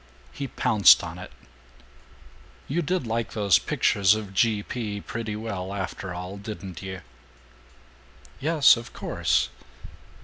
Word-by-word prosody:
He 140 - -5
pounced 120 -5 +5
on - - -7
it: - - -9 1.4
"You 165 +6 0
did 180 -2 -1
like 115 0 -2
those 100 -5 +4
pictures 100 0 +2
of 105 -3 -6
G. 105 +1 +2
P. 105 -4 -4
pretty 110 0 -5
well, 100 -3 -5
after 95 0 -5
all, 90 +3 -6
didn't 100 -3 -8
you!" 95 -1 -7 1.4
"Yes, 155 0 +5
of 115 - -9
course." - - 0
105 Hz, 125 wpm, -25 LUFS, 95-115 Hz, 1.4 s, pounced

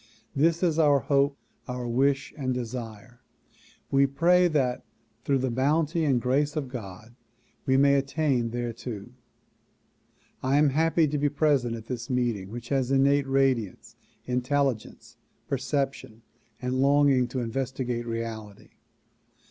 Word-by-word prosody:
This 165 +5 +2
is 165 -3 +2
our 145 -3 +5
hope, 140 +2 +1 0.3
our 125 -1 -4
wish 135 +3 +1
and 130 -4 -2
desire. 120 -1 -7 0.7
We 140 0 +4
pray 175 +6 +3
that 135 -7 0 0.4
through 140 - +2
the 130 -1 -1
bounty 155 +6 +1
and 135 -4 +2
grace 140 +5 0
of 145 -4 -3
God 110 -2 -9 0.5
we 130 0 +4
may 140 0 +5
attain 140 -3 +1
thereto. 120 -2 -5 1.3
I 135 +2 +2
am 150 0 +4
very - - -4
happy 165 0 +3
to 150 0 -2
be 145 0 +2
present 140 -5 +1
at 110 -1 -9
this 120 0 -5
meeting 120 -7 -1
which 120 +2 -8
has 135 -3 0
innate 140 +1 +3
radiance, 135 -7 0 0.3
intelligence, 125 -1 -2 0.3
perception 135 -4 -3 0.4
and 125 0 -2
longing 140 -2 +4
to 130 +2 -4
investigate 125 0 -3
reality. 110 -3 -6
130 Hz, 130 wpm, -27 LUFS, 120-140 Hz, 1.3 s, our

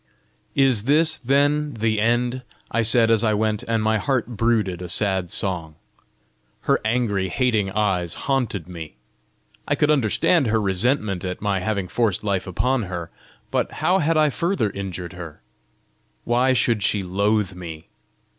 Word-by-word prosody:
"Is 130 -6 +3
this, 160 +3 +4
then, 145 +2 +1
the 110 -1 0
end?" 120 +3 0 0.3
I 115 - +1
said 115 0 +5
as 115 0 +3
I 110 -2 +2
went, 110 0 0
and 115 -1 0
my 110 0 +1
heart 130 -2 0
brooded 110 -6 0
a 90 - -6
sad 95 -1 +2
song. 85 -6 0 0.9
Her - - +1
angry, 110 -4 0
hating 110 -2 0
eyes 95 -5 -1
haunted 125 - -1
me. 85 -4 -9 0.7
I - - +1
could 150 - +2
understand 140 - +2
her 110 0 +1
resentment 100 0 0
at 90 -1 -4
my 100 -2 -1
having 100 -1 -2
forced 110 -2 -1
life 100 -3 -1
upon 125 +7 0
her, 85 -2 -6 0.4
but - - -1
how 185 +2 +1
had 160 0 +1
I 155 -1 +3
further 170 - -1
injured 95 -3 -6
her? 85 -4 -9 0.8
Why 125 +2 +2
should 115 -3 +1
she 105 -1 0
loathe 100 +2 0
me? 85 -3 -9
110 Hz, 155 wpm, -22 LUFS, 95-125 Hz, 0.9 s, said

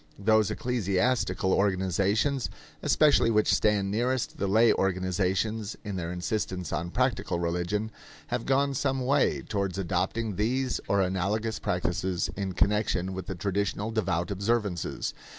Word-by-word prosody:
Those 110 0 +3
ecclesiastical 115 -3 0
organizations 100 - +1 0.3
especially 150 -6 +4
which 110 -1 +3
stand 100 -2 +2
nearest 125 +3 -1
the 100 - 0
lay 110 +4 +5
organizations 95 +3 -1
in 100 -3 -4
their 85 -2 -3
insistence 90 0 -3
on 85 +1 -2
practical 125 -5 0
religion 90 +6 -1 0.4
have 120 -1 -2
gone 140 +1 +2
some 135 -1 -1
way 140 +2 +2
towards 100 -3 -2
adopting 95 +3 -1
these 125 +4 0
or 100 0 +2
analogous 100 +4 -1
practices 90 -2 -1
in 95 -2 -3
connection 95 -2 +1
with 95 -2 -6
the 95 - -4
traditional 100 +3 -1
devout 95 -5 -1
observances. 100 -2 -1
100 Hz, 130 wpm, -28 LUFS, 95-115 Hz, 0.4 s, lay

